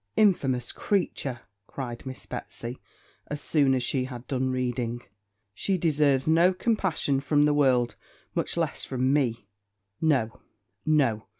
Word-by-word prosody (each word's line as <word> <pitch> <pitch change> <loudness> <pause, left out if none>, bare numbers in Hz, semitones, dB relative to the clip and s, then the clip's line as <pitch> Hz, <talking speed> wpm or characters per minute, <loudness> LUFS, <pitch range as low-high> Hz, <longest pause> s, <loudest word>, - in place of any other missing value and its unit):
'Infamous 135 - +2
creature!' 140 - -1 0.3
cried 125 -2 -6
Miss 130 - -7
Betsy, 120 +2 -7 0.5
as 145 - -4
soon 140 -3 +3
as 125 - 0
she 130 +1 0
had 125 -1 -8
done 130 -1 -1
reading; 120 -2 -2 0.5
'she 190 - 0
deserves 145 -5 +2
no 170 +4 +5
compassion 185 - +1
from 145 +1 +3
the 150 - +3
world, 130 -4 +3 0.4
much - - -1
less - - -1
from 130 +1 0
me. 125 -6 0 0.5
No, 130 -9 +1 0.5
no! 130 -9 +2
135 Hz, 130 wpm, -27 LUFS, 125-150 Hz, 0.5 s, no